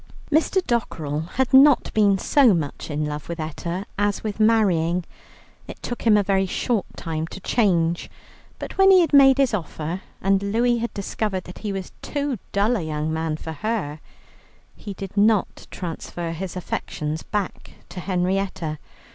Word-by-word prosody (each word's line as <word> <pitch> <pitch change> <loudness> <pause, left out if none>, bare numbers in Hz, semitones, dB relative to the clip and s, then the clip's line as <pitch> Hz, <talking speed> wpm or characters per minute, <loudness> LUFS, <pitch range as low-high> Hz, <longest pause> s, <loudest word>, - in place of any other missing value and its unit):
Mr. 330 +5 +2
Dockerell 160 -10 -2
had 265 0 0
not 275 0 +6
been 205 -2 +4
so 245 0 +4
much 155 -2 -4
in 150 0 -1
love 150 +1 -5
with 170 0 -4
Etta 170 +4 -4
as 205 -1 0
with 215 -1 -4
marrying. 180 -6 +3 0.6
It - - -9
took 240 -1 -4
him 210 -2 +6
a 205 - +3
very 195 -1 +1
short 220 +2 -1
time 160 -1 -3
to 190 - -9
change, 175 -6 +1 0.5
but - - -8
when 385 0 +7
he 375 -1 +8
had 330 - 0
made 270 -1 +7
his 270 -4 +2
offer 170 -2 -3 0.2
and 195 0 +2
Louie 235 +4 +1
had 235 +1 -2
discovered 200 -1 -2
that 180 - -11
he 210 - -3
was 195 -1 -5
too 285 -5 -2
dull 210 +5 +2
a - - -3
young 155 0 -2
man 160 -1 -2
for 160 - -7
her, 180 -5 -3 0.8
he 200 -2 -8
did 195 +1 -8
not 210 0 +2
transfer 170 -1 -5
his 180 +3 -5
affections 155 -3 -4
back 205 -3 -4 0.2
to - - -7
Henrietta. 180 -3 -1
195 Hz, 165 wpm, -23 LUFS, 165-225 Hz, 0.8 s, he